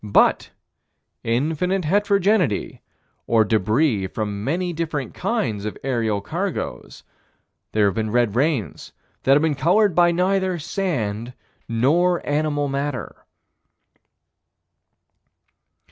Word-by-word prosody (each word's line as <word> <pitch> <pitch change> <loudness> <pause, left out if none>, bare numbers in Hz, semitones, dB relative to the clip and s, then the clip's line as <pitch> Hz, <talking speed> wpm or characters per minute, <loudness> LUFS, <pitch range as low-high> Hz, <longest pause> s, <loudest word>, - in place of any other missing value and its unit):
But 105 -2 +3 0.7
infinite 160 +10 0
heterogeneity 200 - +1 0.5
or 115 -2 +4
débris 110 0 +1
from 105 -2 -3
many 175 +7 -1
different 155 -6 -3
kinds 115 - -2
of 105 - -5
aerial 115 -6 0
cargoes 100 - -4 0.7
there 105 -1 +3
have 100 - +2
been 110 +1 -2
red 120 -2 +1
rains 130 - -1 0.3
that 135 - +4
have 145 +2 +4
been 160 -2 +2
colored 180 +8 +3
by 175 +1 +4
neither 185 +1 +1
sand 125 - -3 0.4
nor 165 +10 +2
animal 145 -1 0
matter. 140 -3 -4
145 Hz, 100 wpm, -22 LUFS, 110-175 Hz, 0.7 s, or